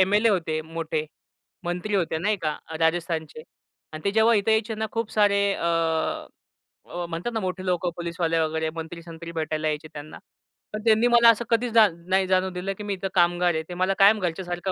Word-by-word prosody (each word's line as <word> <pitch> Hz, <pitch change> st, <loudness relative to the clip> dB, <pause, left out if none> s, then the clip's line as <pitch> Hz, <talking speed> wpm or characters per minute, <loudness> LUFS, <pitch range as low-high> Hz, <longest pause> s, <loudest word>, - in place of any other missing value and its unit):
MLA 205 Hz, +4 st, +4 dB
होते 165 Hz, -5 st, 0 dB
मोठे. 160 Hz, -1 st, -3 dB, 0.6 s
मंत्री 180 Hz, +4 st, -3 dB
होते 170 Hz, -4 st, 0 dB
नाही 210 Hz, +5 st, 0 dB
का 155 Hz, -1 st, -1 dB, 0.2 s
राजस्थानचे 160 Hz, -2 st, -1 dB, 0.5 s
आणि 155 Hz, -, -8 dB
ते 200 Hz, -, +2 dB
जेव्हा 220 Hz, +2 st, +4 dB
इथे 205 Hz, +1 st, +1 dB
यायचे 220 Hz, +1 st, 0 dB
ना, 220 Hz, 0 st, -2 dB
खूप 230 Hz, -1 st, -2 dB
सारे, 205 Hz, -1 st, +3 dB
अ, 165 Hz, -1 st, -1 dB, 0.8 s
म्हणतात 170 Hz, +8 st, -3 dB
ना, 225 Hz, -, -1 dB
मोठे 185 Hz, -1 st, -4 dB
लोकं 180 Hz, -1 st, 0 dB
पोलिसवाले 170 Hz, -1 st, -1 dB
वगैरे 160 Hz, 0 st, 0 dB
मंत्री, 165 Hz, +1 st, -7 dB
संत्री 170 Hz, 0 st, -9 dB
भेटायला 155 Hz, -1 st, -2 dB
यायचे 150 Hz, +1 st, -3 dB
त्यांना. 150 Hz, 0 st, -9 dB, 0.6 s
पण 215 Hz, -, -4 dB
त्यांनी 225 Hz, +1 st, +4 dB
मला 235 Hz, -1 st, +6 dB
असं 230 Hz, +1 st, +3 dB
कधीचजान 225 Hz, -7 st, +3 dB
नाही 190 Hz, 0 st, +2 dB
जाणू 185 Hz, 0 st, +2 dB
दिलं, 185 Hz, +2 st, -4 dB
की 210 Hz, -, -7 dB
मी 205 Hz, -1 st, -2 dB
इथं 195 Hz, 0 st, -3 dB
कामगार 175 Hz, 0 st, +3 dB
आहे. 160 Hz, 0 st, -2 dB
ते 180 Hz, -, -5 dB
मला 185 Hz, +2 st, +1 dB
कायम 205 Hz, +2 st, +6 dB
घरच्यासारखं 175 Hz, 0 st, -3 dB
180 Hz, 185 wpm, -25 LUFS, 165-205 Hz, 0.8 s, मला